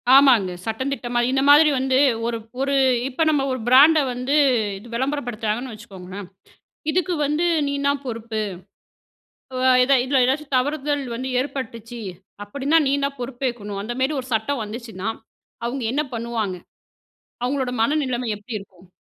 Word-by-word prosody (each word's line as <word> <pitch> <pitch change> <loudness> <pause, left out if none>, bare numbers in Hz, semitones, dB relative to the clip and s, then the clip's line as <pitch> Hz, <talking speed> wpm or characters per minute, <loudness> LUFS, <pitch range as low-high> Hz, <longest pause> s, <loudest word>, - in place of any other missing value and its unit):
ஆமாங்க. 250 -9 +6
சட்டந்திட்டமா. 245 +1 -2
இந்த 270 0 +2
மாதிரி 300 +2 +8
வந்து, 260 0 +1 0.3
ஒரு 235 -1 -1 0.2
ஒரு 275 +1 +1 0.3
இப்ப 275 +5 0
நம்ம 295 -3 +2
ஒரு 255 - -2
பிராண்ட 290 +6 +7
வந்து, 250 +4 -1 0.4
இது 210 +5 -13
விளம்பரப்படுத்துறாங்கன்னு 245 -3 -2
வச்சுக்கோங்களே. 195 -3 -9 0.7
இதுக்கு 360 +1 0
வந்து 300 +4 0 0.2
நீந்தான் 280 0 0
பொறுப்பு. 225 -2 -4 1.3
அ - - +6
எதா 270 +2 +4
இதுல 265 0 +2
ஏதாச்சும் 275 +2 -1
தவறுதல் 290 +1 0
வந்து 255 +3 -4
ஏற்பட்டுச்சு 240 -4 -6 0.4
அப்படின்னா, 280 +9 +1
நீந்தான் 280 0 -1
பொறுப்பேக்கணும். 240 -5 -4
அந்த 235 +4 -4
மாதிரி 265 +4 +1
ஒரு 255 - -11
சட்டம் 225 +3 -1
வந்துச்சுன்னா, 220 -2 -6 0.6
அவங்க 250 +3 -3
என்ன 290 +3 +1
பண்ணுவாங்க? 225 -5 -2 0.9
அவங்களோட 260 0 -1
மனநிலைமை 255 -2 0
எப்படி 215 +2 -6
இருக்கும்? 190 -2 -17
255 Hz, 130 wpm, -22 LUFS, 230-280 Hz, 1.3 s, மாதிரி